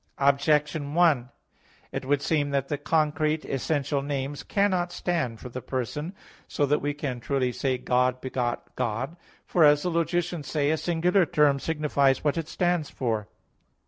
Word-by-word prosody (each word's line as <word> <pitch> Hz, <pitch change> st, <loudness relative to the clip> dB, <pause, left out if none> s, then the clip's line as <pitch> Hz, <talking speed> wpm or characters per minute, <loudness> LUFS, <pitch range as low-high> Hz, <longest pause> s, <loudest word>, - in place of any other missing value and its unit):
Objection 145 Hz, +1 st, +2 dB
1: 155 Hz, -8 st, +3 dB, 0.6 s
It -, -, -4 dB
would 145 Hz, +1 st, +1 dB
seem 150 Hz, -3 st, +1 dB
that 140 Hz, -1 st, -1 dB
the 145 Hz, -, -1 dB
concrete, 155 Hz, 0 st, +1 dB
essential 140 Hz, +1 st, -1 dB
names 140 Hz, 0 st, -3 dB
cannot 185 Hz, -3 st, +1 dB
stand 165 Hz, -11 st, -2 dB
for 125 Hz, -, -8 dB
the 130 Hz, +1 st, -6 dB
person, 150 Hz, -, -4 dB, 0.3 s
so 145 Hz, -, 0 dB
that 150 Hz, +2 st, +1 dB
we 145 Hz, -, 0 dB
can 140 Hz, -4 st, -4 dB
truly 130 Hz, 0 st, 0 dB
say 130 Hz, +1 st, -1 dB
"God 125 Hz, 0 st, +1 dB
begot 125 Hz, -2 st, -3 dB
God." 125 Hz, +5 st, -2 dB, 0.3 s
For, 170 Hz, -, +3 dB
as 145 Hz, -1 st, +6 dB
the 180 Hz, -, 0 dB
logicians 170 Hz, -1 st, -1 dB
say, 145 Hz, -1 st, +1 dB
"a 160 Hz, -, +1 dB
singular 175 Hz, +2 st, +2 dB
term 145 Hz, -2 st, +3 dB
signifies 140 Hz, -4 st, +1 dB
what 145 Hz, -2 st, +1 dB
it 165 Hz, -2 st, -3 dB
stands 175 Hz, -4 st, 0 dB
for." 110 Hz, -5 st, -2 dB
145 Hz, 160 wpm, -26 LUFS, 130-160 Hz, 0.6 s, as